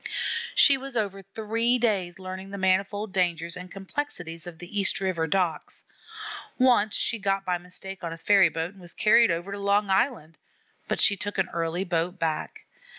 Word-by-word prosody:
She 280 -2 +7
was 270 -2 -5
over 200 -3 -2
three 225 +5 0
days 200 -7 0
learning 190 0 -7
the 200 - -6
manifold 195 +2 0
dangers 170 -2 0
and 180 0 -8
complexities 180 - -5
of 170 -2 -8
the 175 +5 -3
East 195 - +4
River 185 -4 -1
docks. 175 -2 -1 0.7
Once 245 -5 +4
she 230 - 0
got 195 -1 0
by 180 -1 0
mistake 185 +2 -10
on 165 - -3
a 165 - -6
ferryboat 170 -3 +3
and 195 -1 -17
was 175 -1 -7
carried 230 +2 +5
over 170 +4 -2
to 200 - -5
Long 200 0 +2
Island; 190 - 0 0.5
but - - -1
she 200 - +6
took 205 +2 -5
an 190 -1 +1
early 170 +2 -2
boat 175 0 -1
back. 160 -3 -3
190 Hz, 175 wpm, -26 LUFS, 175-205 Hz, 0.7 s, She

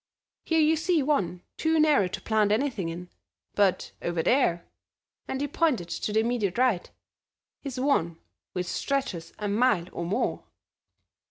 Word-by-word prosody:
Here 325 -1 +2
you 315 +1 +4
see 325 -1 +1
one 190 - 0
too 320 0 +2
narrow 300 -11 +4
to 180 - -6
plant 215 -2 +2
anything 220 -6 0
in, 175 +2 -7 0.4
but 200 -3 +1
over 170 -1 -1
there," 175 - +2 0.6
and 265 - -3
he 290 - -1
pointed 265 - 0
to 210 - -3
the 220 +1 +3
immediate 225 -5 -1
right, 245 -8 +2 0.7
"is 270 -3 -5
one 170 - +1 0.4
which 180 0 -2
stretches 190 -6 -2
a 210 - -3
mile 205 -3 +2
or 170 - -4
more." 175 +4 -1
220 Hz, 150 wpm, -27 LUFS, 180-280 Hz, 0.7 s, you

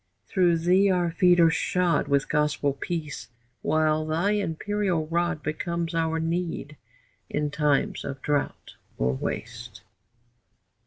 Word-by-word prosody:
Through 175 -4 +2
thee 185 +4 +3
our 175 -2 +1
feet 175 +1 +4
are 165 -1 +6
shod 180 0 +1
With 140 -1 +1
gospel 150 -2 +1
peace, 155 +1 -5 0.3
while 155 0 +2
thy 165 +6 0
imperial 200 -2 -1
rod 170 -1 -1
Becomes 170 +3 -3
our 165 0 0
need 165 -3 -3 0.5
in 150 0 -1
times 150 -2 +1
of 135 - -5
drought 145 -1 -2 0.2
or 65 +1 +1
waste. 65 - -6
165 Hz, 120 wpm, -26 LUFS, 150-175 Hz, 0.5 s, are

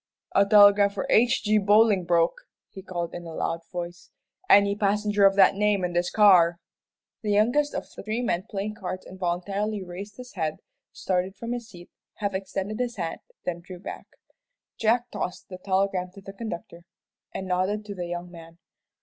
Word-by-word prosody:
"A 200 0 +4
telegram 205 -1 +7
for 200 - -4
H.J. 215 -2 +3
Bolingbroke," 205 - +3 0.2
he 190 - -9
called, 175 -3 -5
in 175 - -6
a 165 - -8
loud 165 - -2
voice; 175 0 -6 0.4
"any 200 0 +6
passenger 205 0 +3
of 195 - +1
that 195 -1 +6
name 205 -1 +1
in 175 -1 -1
this 175 +1 +1
car?" 180 -5 +5 0.6
The 215 - -3
youngest 245 +8 +2
of - - -3
the - - -7
three 220 +4 -2
men 190 -3 -1
playing 205 +1 -3
cards 185 -1 -5
involuntarily 195 +3 -3
raised 190 +3 -9
his 250 -1 -10
head, 160 -5 -2 0.4
started 185 +1 -2
from 230 0 -6
his 240 -1 -5
seat, 175 -4 -14 0.2
half 200 -2 -3
extended 195 +3 -4
his 245 -1 -2
hand, 170 -5 -4 0.3
then 175 -1 -2
drew 180 +1 -10
back. 180 - -8 0.7
Jack 235 +2 +1
tossed 180 - -5
the 185 -1 -8
telegram 190 -1 0
to 195 - -11
the 195 0 -10
conductor, 175 -5 -7 0.5
and 190 - -5
nodded 190 +4 -1
to 205 - -6
the 180 -3 -5
young 175 0 -5
man. 165 -1 -13
195 Hz, 175 wpm, -26 LUFS, 180-210 Hz, 0.7 s, telegram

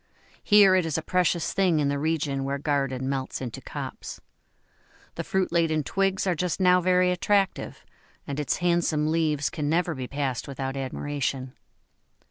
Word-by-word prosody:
Here 205 -2 +6
it 185 -1 +3
is 165 -2 -2
a 160 - -3
precious 175 -3 0
thing 185 -5 +2
in 145 - +1
the 140 0 -1
region 145 -3 -1
where 140 +1 -2
garden 135 -3 -1
melts 135 -1 -3
into 125 -3 -6
copse. - - -7 0.9
The - - -4
fruit 190 -1 -1
laden 165 -3 +1
twigs 195 +7 0
are 185 - +2
just 180 +2 -2
now 180 -1 +5
very 180 0 +3
attractive, 195 +1 0 0.4
and 140 +1 -4
its 150 - 0
handsome 170 -3 +1
leaves 155 -3 0
can 150 -3 -2
never 170 +1 +1
be 130 -3 -5
passed 135 -3 -3
without 135 -1 -4
admiration. 135 -1 -3
155 Hz, 160 wpm, -26 LUFS, 140-180 Hz, 0.9 s, Here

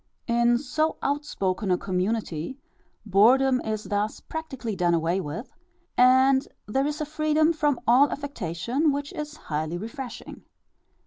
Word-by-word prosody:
In 235 0 +3
so 310 +5 -1
outspoken 225 -9 -1
a 180 - +3
community, 185 - -2 0.5
boredom 250 +6 +4
is 215 -1 -3
thus 205 +1 -2
practically 265 -9 -5
done 175 -2 +2
away 170 +3 0
with, 170 - -6 0.4
and 260 +2 +5 0.2
there 270 +6 0
is 300 +1 -3
a - - -1
freedom 310 +1 +2
from 295 -4 +1
all 260 +5 +5
affectation 270 - -1
which 285 +4 -4
is 300 -2 -6
highly 155 +2 -3
refreshing. 230 +4 -7
245 Hz, 130 wpm, -26 LUFS, 195-285 Hz, 0.5 s, and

